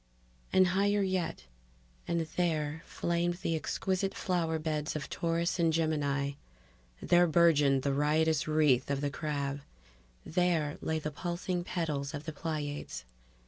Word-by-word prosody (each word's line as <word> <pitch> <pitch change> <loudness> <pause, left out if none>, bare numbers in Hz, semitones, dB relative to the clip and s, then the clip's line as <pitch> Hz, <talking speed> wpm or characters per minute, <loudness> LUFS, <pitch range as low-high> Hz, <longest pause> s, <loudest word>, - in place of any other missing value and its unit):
And 185 0 +6
higher 200 +2 +2
yet 185 - -2 0.6
and 170 -1 +1
there 160 -2 -1
flamed 170 0 0
the 165 -2 -2
exquisite 190 +4 -1
flower 165 -3 0
beds 155 -1 -2
of 145 -2 -5
Taurus 170 +1 0
and 165 -1 +4
Gemini, 145 -3 0 0.7
there 175 0 +4
burgeoned 150 -5 +4
the 140 - +1
riotous 155 +2 +2
wreath 150 -5 +3
of 140 -1 0
the 145 -1 -1
Crab; 140 -2 -3 0.6
there 165 -4 +1
lay 160 - -1
the 155 -1 -3
pulsing 175 +3 -3
petals 155 -5 -2
of 145 - -6
the 160 0 -5
Pleiades 145 - -4
160 Hz, 135 wpm, -31 LUFS, 145-175 Hz, 0.7 s, And